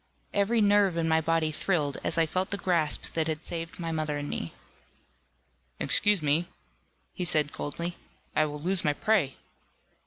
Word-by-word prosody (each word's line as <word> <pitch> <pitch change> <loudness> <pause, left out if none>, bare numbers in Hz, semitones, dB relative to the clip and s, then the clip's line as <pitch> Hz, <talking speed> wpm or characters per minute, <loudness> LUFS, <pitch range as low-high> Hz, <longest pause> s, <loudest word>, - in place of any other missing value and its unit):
Every 210 +3 +2
nerve 205 -3 +4
in 165 -1 +1
my 160 0 +3
body 160 -1 +1
thrilled, 150 -3 -1
as - - 0
I 165 - +4
felt 185 +4 -1
the 200 - -2
grasp 170 -6 0
that 160 -1 0
had 155 0 -3
saved 165 -1 -5
my 165 -1 -3
mother 155 -2 -1
and 145 0 -4
me. 85 - -4 1.3
"Excuse 205 -5 +3
me," 155 +4 +2 0.7
he - - -3
said 155 -4 +2
coldly, 170 +4 -4 0.4
"I 155 - +4
will 150 -1 -5
lose 185 +4 +1
my 150 - +2
prey." 185 -7 +1
165 Hz, 165 wpm, -28 LUFS, 155-185 Hz, 1.3 s, nerve